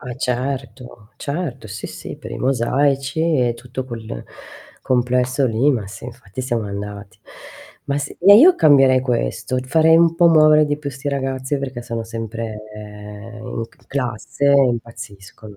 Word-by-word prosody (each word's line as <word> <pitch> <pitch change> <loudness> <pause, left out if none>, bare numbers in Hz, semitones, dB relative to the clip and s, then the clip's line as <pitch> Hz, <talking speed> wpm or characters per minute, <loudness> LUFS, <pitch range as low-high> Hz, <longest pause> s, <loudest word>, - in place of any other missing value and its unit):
Ah, 125 - -8
eh, 120 - -6
certo, 125 -3 -4
certo, 140 -6 -5
sì, 95 - -6
sì, - - -8
per - - -10
i - - -5
mosaici 135 +3 0
e 140 -8 +2
tutto 125 +2 -7
quel 115 - -7 0.6
complesso 125 +2 +1
lì, 120 +5 +2
ma 115 -8 -2
sì 100 - -10
infatti 120 -2 -9
siamo 120 -4 -2
andati. 100 0 -7 0.7
Ma 140 0 -1
sì 145 0 -6
e 200 +3 +8
io 345 +11 +8
cambierei 135 -4 +5
questo, 125 - -2
farei 160 +4 +4
un 165 0 +4
po' 175 0 +5
muovere 155 -1 +6
di 145 0 -1
più 145 -2 -5
'sti 135 +2 -6
ragazzi, 135 0 -2
perché 130 -3 -5
sono 115 -1 -4
sempre 115 -1 -6
in 105 +2 -8
c - - -27
classe 125 0 -3
e 140 -1 +5
impazziscono 110 -4 -7
125 Hz, 160 wpm, -20 LUFS, 115-140 Hz, 0.7 s, e